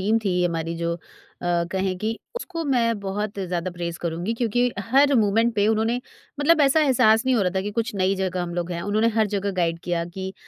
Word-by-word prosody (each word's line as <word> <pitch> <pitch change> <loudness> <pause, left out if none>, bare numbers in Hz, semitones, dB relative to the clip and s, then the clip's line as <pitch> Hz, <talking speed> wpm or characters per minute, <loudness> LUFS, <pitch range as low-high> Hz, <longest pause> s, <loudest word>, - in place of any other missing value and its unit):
Team 215 +4 +2
थी 180 -2 +1
हमारी 165 -1 -2
जो 170 +1 -2 0.4
अ, 175 -1 +1
कहें 190 -1 -1
कि, 220 +2 -2 0.2
उसको 340 -8 -4
मैं 235 -6 +1
बहुत 200 +1 -3
ज़्यादा 180 -2 -2
प्रेज़ 170 -1 -5
करूँगी 170 +5 -2
क्योंकि 235 0 0 0.3
हर 280 +2 +5
मोमेंट 225 +1 +3
पे 205 0 +2
उन्होंने 225 +2 +1 0.4
मतलब 315 +2 +4
ऐसा 280 +2 +4
एहसास 225 -6 +4
नहीं 260 - +3
हो 210 - +2
रहा 180 - +1
था 190 - +2
कि 205 - -3
कुछ 230 +2 -2
नई 190 0 +1
जगह 185 -1 -1
हम 175 -1 -5
लोग 175 0 -3
हैं। 170 - -3
उन्होंने 215 +4 +2
हर 220 -1 +4
जगह 200 0 0
गाइड 165 -1 +1
किया 170 -1 -1
कि 190 0 -5
200 Hz, 220 wpm, -24 LUFS, 175-230 Hz, 0.4 s, हर